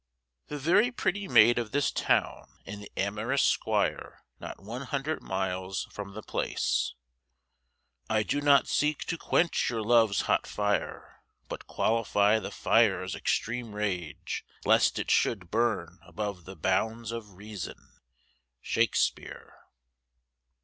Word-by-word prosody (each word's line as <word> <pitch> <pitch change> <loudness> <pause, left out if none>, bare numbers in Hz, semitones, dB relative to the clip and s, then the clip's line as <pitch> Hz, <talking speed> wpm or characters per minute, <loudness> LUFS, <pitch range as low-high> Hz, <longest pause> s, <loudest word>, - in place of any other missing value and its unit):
THE 150 - -5
VERY 175 - +3
PRETTY 205 -4 -2
MAID 120 -5 +6
OF 115 -2 -4
THIS 145 0 +2
TOWN, - - 0 0.2
AND 100 +1 -7
THE 100 - -11
AMOROUS 105 +7 0
'SQUIRE, - - 0 0.2
NOT - - -8
ONE 115 +6 -7
HUNDRED 145 +2 -2
MILES 95 0 -3
FROM 100 -1 -8
THE 110 - -7
PLACE. - - -1 1.1
"I 110 -1 +2
do 145 - -1
not 145 -1 +5
seek 150 0 +1
to 170 - -2
quench 170 0 +1
your 115 -2 -2
love's 110 -3 +4
hot - - +1
fire, 105 0 -2 0.3
but - - -7
qualify 110 -1 +2
the - - -6
fire's - - +2
extreme 115 -1 -2
rage, 95 -6 -3 0.2
lest - - +4
it - - -1
should 95 -7 +1
burn 100 -7 0
above 90 +1 -5
the 95 - -9
bounds 110 +5 -1
of 110 -4 -7
reason." 100 -1 -9 0.7
_Shakespeare. - - 0
110 Hz, 130 wpm, -29 LUFS, 100-120 Hz, 1.1 s, MAID